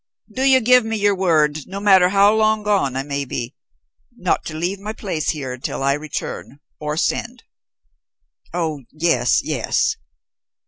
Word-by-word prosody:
Do 260 - -4
you 265 -1 +5
give 250 +1 +5
me 225 0 -3
your 205 0 +2
word, 155 -5 +1
no 195 +1 -6
matter 190 -3 +5
how 200 +2 +5
long 220 -1 +2
gone 200 -11 +1
I 135 - -1
may 140 0 -3
be, 125 -1 -5 0.6
not - - 0
to 155 - -6
leave 175 +5 -2
my 210 +2 -5
place 175 -8 -3
here 135 -5 -3
until 130 +1 -5
I 140 0 +3
return, 145 -1 -6 0.2
or 150 0 -3
send?" 235 +7 -2 1.1
"Oh, 160 -4 -2
yes, 155 -6 +1
yes." - - 0
175 Hz, 155 wpm, -20 LUFS, 145-210 Hz, 1.1 s, you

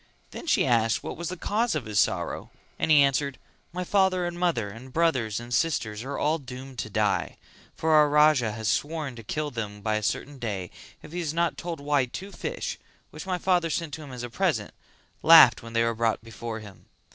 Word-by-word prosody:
Then - - -8
she - - +3
asked 115 -3 +2
what - - -5
was 170 0 -4
the 185 - -5
cause 215 +3 0
of 145 -6 -2
his 105 -1 0
sorrow - - 0 0.3
and - - 0
he 150 -2 +7
answered 140 0 0 0.3
"My 180 +1 -3
father 190 -1 +2
and 175 0 -3
mother 170 -12 0
and 115 +5 -11
brothers 130 -10 +1
and 120 +1 -7
sisters 115 -8 0
are 140 +2 -4
all 155 +2 +1
doomed 130 -1 -9
to - - -3
die; 105 -1 0 0.4
for 160 - 0
our 150 -1 +6
Raja 150 -6 +4
has 110 0 -4
sworn 150 +1 -1
to 115 - -9
kill 150 +7 -3
them 105 -3 -5
by 110 0 0
a - - -3
certain 140 +6 -3
day 100 -7 -4 0.3
if - - -11
he 175 - -4
is 160 -2 -3
not 170 0 +1
told 170 -3 -5
why 145 -2 +1
two 190 +10 -7
fish, - - -4 0.3
which - - -9
my 185 -1 0
father 175 -2 +1
sent 160 -2 -2
to 160 - -5
him 145 -3 -10
as 125 -1 -6
a 120 - -5
present, - - 0 0.5
laughed - - +8
when 115 0 -10
they 115 0 +3
were 115 0 +1
brought 115 0 0
before 115 0 -6
him. 100 -3 -14
140 Hz, 215 wpm, -26 LUFS, 115-165 Hz, 0.5 s, laughed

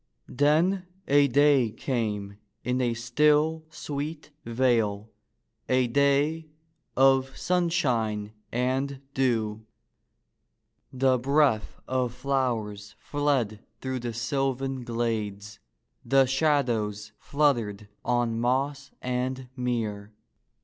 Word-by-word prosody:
Then 165 +7 +2 0.2
a 145 0 +5
day 140 -2 +4
came 105 -5 -3 0.2
in 125 +1 0
a 120 -2 +1
still, 150 +6 +2
sweet 150 0 -5
vale, 115 -3 +1 0.6
a 130 0 +3
day 140 +5 +2 0.5
of 135 0 +4
sun 180 -1 +1
shine 110 -10 0 0.2
and 130 +3 -1
dew. 110 -5 0 1.3
The 130 -1 +2
breath 135 -4 +2
of 125 -2 -1
flowers 115 -6 -2
fled 140 -8 -1 0.2
through 130 0 -3
the 120 -1 -4
sylvan 135 +1 -1
glades, 110 -3 -3 0.4
the 135 0 +4
shadows 125 -7 0
fluttered 120 -9 0 0.2
on 120 -2 0
moss 135 +3 0
and 125 +1 -2
mere. 110 -5 -3
130 Hz, 95 wpm, -27 LUFS, 115-140 Hz, 1.3 s, a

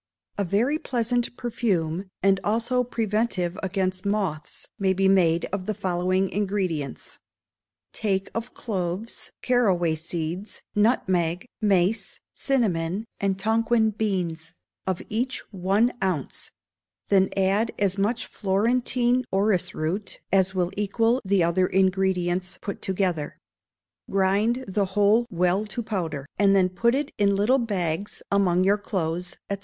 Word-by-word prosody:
A 200 - 0
very 230 - +1
pleasant 240 -2 -1
perfume, 190 -7 -1
and 195 0 +4
also 235 +4 +1
preventive 215 -6 -1
against 185 -1 -1
moths, 195 -7 -2
may 190 -1 +2
be 190 +1 +2
made 170 -4 +4
of 190 -2 -3
the 215 - -1
following 185 0 0
ingredients: 190 -8 -2 0.7
Take 195 -3 -1
of 230 +2 -5
cloves, 195 0 -4
caraway 190 -10 +2
seeds, 165 +4 -5
nutmeg, 185 -5 +1 0.2
mace, 200 0 +1
cinnamon, 200 -7 0
and 195 -1 0
Tonquin 220 +2 +2
beans, 180 -7 -2 0.3
of 185 -2 -1
each 245 +4 -1
one 195 +6 +2
ounce; 180 -8 -2 0.6
then 195 -1 +4
add 195 +4 +2
as 200 -1 +1
much 225 +4 0
Florentine 240 +5 +1
orris 190 -2 +1
root 185 +6 -2
as 190 0 +3
will 180 -1 0
equal 225 +5 +1
the 195 -2 +2
other 175 +2 +2
ingredients 185 -1 +1
put 200 - -6
together. 180 -6 -1 0.7
Grind 205 +6 +1
the 195 +1 +1
whole 210 +4 +4
well 180 +1 +1
to 235 +3 -4
powder, 165 -10 -3
and 200 -1 +5
then 185 -1 +4
put 235 +7 +2
it 285 +1 -1
in 200 -1 +3
little 225 +7 +3
bags 200 -4 -2
among 185 -3 +3
your 200 +2 +3
clothes, 175 -3 -3
&c. 200 - 0
195 Hz, 130 wpm, -25 LUFS, 180-220 Hz, 0.7 s, and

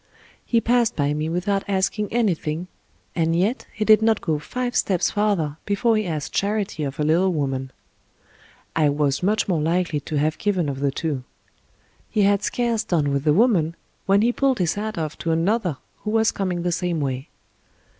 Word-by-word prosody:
He 235 - +2
passed 240 0 +2
by 145 -1 +1
me 155 +1 -2
without 195 +4 0
asking 200 +1 0
anything, 180 -8 0 0.5
and 165 -1 +1
yet 200 +9 0
he 215 - -2
did 215 0 +6
not 220 -1 +3
go 155 -2 -1
five 245 +10 -4
steps 185 -4 +1
farther 195 -8 0
before 220 +3 +1
he 215 -3 0
asked 155 -4 -4
charity 200 -5 -1
of 140 0 -4
a - - +2
little 170 +5 +3
woman, 135 -4 -2 1.1
I 155 -2 +3
was 145 -1 0
much 210 +5 +1
more 170 -5 +1
likely 165 -1 0
to 150 - -6
have 155 +2 0
given 185 -7 0
of 135 -1 -4
the 140 0 +1
two. 140 -1 -3 0.9
He 210 - +2
had 200 0 +3
scarce 235 0 0
done 150 -5 0
with 140 +1 -1
the 150 - +5
woman, 175 -6 +3 0.3
when 200 +2 +4
he 240 - +3
pulled 270 -1 +2
his 175 -4 +1
hat 215 0 -4
off 155 -2 -4
to 165 - -3
another 175 - +1 0.2
who 215 - -6
was 225 0 +3
coming 180 -3 -2
the 175 - 0
same 175 -1 -1
way. 135 +1 -3
180 Hz, 185 wpm, -23 LUFS, 155-210 Hz, 1.1 s, did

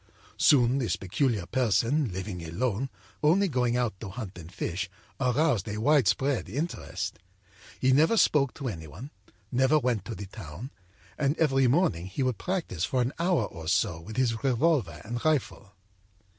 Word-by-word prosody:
âSoon 130 -1 +5
this 120 - 0
peculiar 100 +1 -1
person, 125 - +1
living 90 -1 -5
alone, 115 +9 -2 0.3
only 180 +7 +4
going 125 -5 +1
out 120 -3 0
to 105 - -6
hunt 100 -1 -7
and 85 -1 -10
fish, 95 +1 -3 0.3
aroused 125 - +2
a 105 0 -3
widespread 135 -1 +2
interest. 95 - -4 0.6
He 130 - +3
never 160 - +4
spoke 140 - +3
to 140 - -5
any 80 -9 -5
one, 105 - -10 0.4
never 130 +4 +4
went 125 -8 0
to 115 - -5
the 100 - -6
town, 95 - -9 0.5
and 145 +1 +1
every 135 -4 +3
morning 130 - +2
he 95 +8 -2
would 130 -3 -1
practice 170 - -2
for 125 +5 +1
an 125 - -2
hour 170 - +2
or 80 -5 -9
so 90 0 +1
with 110 +7 -9
his 115 -2 +1
revolver 125 - +1
and 120 +2 -4
rifle. 135 -9 -1
120 Hz, 160 wpm, -28 LUFS, 95-140 Hz, 0.6 s, âSoon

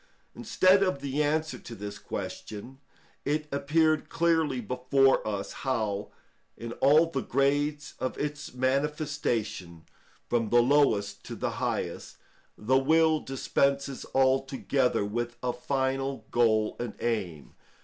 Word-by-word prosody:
Instead 185 +1 +3
of 185 -7 +1
the 140 +1 -2
answer 155 +1 0
to 115 - -9
this 105 -1 -7
question, 120 +5 -7 0.4
it 150 +1 -1
appeared 155 +3 +1
clearly 160 -5 +1
before 130 +3 +2
us 100 -2 -3
how, 110 -6 -2 0.5
in 115 0 -6
all 155 +4 +5
the 135 - -1
grades 145 +4 0
of 130 - -3
its 150 0 -4
manifestation, 130 - -2 0.4
from 115 -3 0
the 120 - +5
lowest 110 -7 +2
to - - -7
the - - -2
highest, - - -3 0.4
the 130 +5 +2
will 160 +3 +3
dispenses 140 0 -1
altogether 135 -3 +2
with 120 +3 -3
a 125 -1 0
final 135 -1 -2
goal 110 -3 +2
and 120 -3 -4
aim. 95 -11 -3
135 Hz, 120 wpm, -28 LUFS, 115-145 Hz, 0.5 s, all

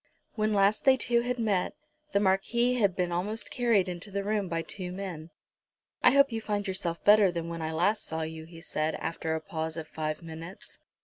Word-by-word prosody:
When 215 -1 0
last 200 +1 +3
they 265 -1 +6
two 235 -1 +2
had 250 +1 -2
met, 205 -6 0 0.4
the 200 - +3
Marquis 210 +6 +2
had 200 -5 +3
been 180 -1 0
almost 205 +5 -2
carried 235 -7 +2
into 180 +3 -5
the 200 0 -2
room 205 -1 0
by 165 0 -1
two 180 0 -5
men. 180 -4 -6 0.7
"I - - +7
hope 280 -1 +5
you 225 -1 -2
find 205 -1 -2
yourself 175 -3 -3
better 205 -2 +6
than 170 -1 -4
when 165 -1 -5
I 160 0 -2
last 180 +7 +1
saw 160 0 -3
you," 160 0 -6
he 165 0 -12
said, 155 -1 -1
after 160 -1 -2
a - - -1
pause 160 -2 -4
of 160 -1 -5
five 155 +1 -4
minutes. 165 +3 -10
190 Hz, 205 wpm, -29 LUFS, 165-215 Hz, 0.7 s, I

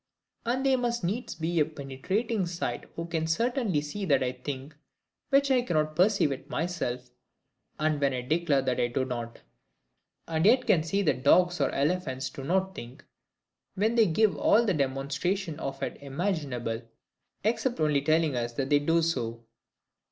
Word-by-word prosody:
And 260 +3 0
they 270 -1 +4
must 240 -3 -1
needs 215 +9 -2
have 160 - -11 0.2
a - - +6
penetrating 160 - -2
sight 170 0 -3
who 165 - -4
can 160 -1 -2
certainly 225 - +1
see 150 +8 -5
that 140 -6 +3
I 125 - 0
think, 135 +3 -7 0.5
when 275 0 +5
I 255 -2 +4
cannot 155 -9 0
perceive 185 -3 +3
it 135 - -6
myself, 130 -7 -3 0.7
and 155 -1 +1
when 140 -1 +3
I 125 -1 -2
declare 145 +1 +1
that 130 -2 0
I 120 - +2
do 130 +2 -1
not; 120 -2 -5 0.9
and 160 -1 0
yet 250 +2 +5
can 170 - +4
see 195 +6 0
that 135 -7 0
dogs 175 +3 +4
or 140 - +3
elephants 140 -3 -1
do 135 - -8
not 190 +5 0
think, 120 -3 -10 0.7
when 215 +4 +1
they 230 -2 +5
give 200 +5 +3
all 235 +2 +4
the 200 - +2
demonstration 145 +5 -1
of 135 -2 -4
it - - -4
imaginable, 140 - -2 0.6
except 230 +2 0
only 150 -2 +2
telling 155 -1 +2
us 120 -1 -2
that 135 +3 -3
they 145 - +6
do 165 +3 +2
so. 115 -8 -2
155 Hz, 170 wpm, -28 LUFS, 135-190 Hz, 0.9 s, a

